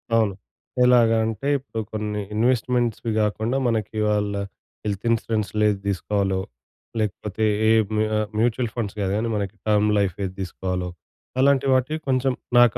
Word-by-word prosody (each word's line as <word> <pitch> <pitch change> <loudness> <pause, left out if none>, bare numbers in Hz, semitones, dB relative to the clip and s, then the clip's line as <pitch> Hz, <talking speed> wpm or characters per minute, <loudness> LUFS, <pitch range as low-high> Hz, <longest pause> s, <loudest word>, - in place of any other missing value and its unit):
అవును. 110 -4 +3 0.5
ఎలాగ 120 -2 +6 0.2
అంటే 110 +4 -3
ఇప్పుడు 130 -4 -7
కొన్ని 105 -1 -2
ఇన్వెస్ట్మెంట్స్‌వి 120 -1 +1
గాకుండా 110 +5 0
మనకి 110 -2 -1
వాళ్ళ 105 -1 +1 0.5
హెల్త్ 105 +2 -3
ఇన్స్యూరెన్స్‌లేది 105 -2 +1
తీసుకోవాలో? 95 +1 0 0.6
లేకపోతే 105 +1 -2 0.2
ఏ - - +6 0.2
మ్యూ 110 0 +2
ఆహ్, 105 -1 0
మ్యూచువల్ 120 0 +1
ఫండ్స్ 110 -4 -3
గాదు 95 -1 0
గనీ 115 +1 -1
మనకి 100 0 -3
టర్మ్ 105 0 +3
లైఫ్ 100 -3 +1
ఏది 95 -1 -3
తీసుకోవాలో? 90 -1 -3 0.5
అలాంటి 140 0 +4
వాటికి 135 +5 +1
కొంచెం 130 0 +2 0.2
నాక 120 -3 +6
110 Hz, 135 wpm, -23 LUFS, 100-120 Hz, 0.6 s, ఎలాగ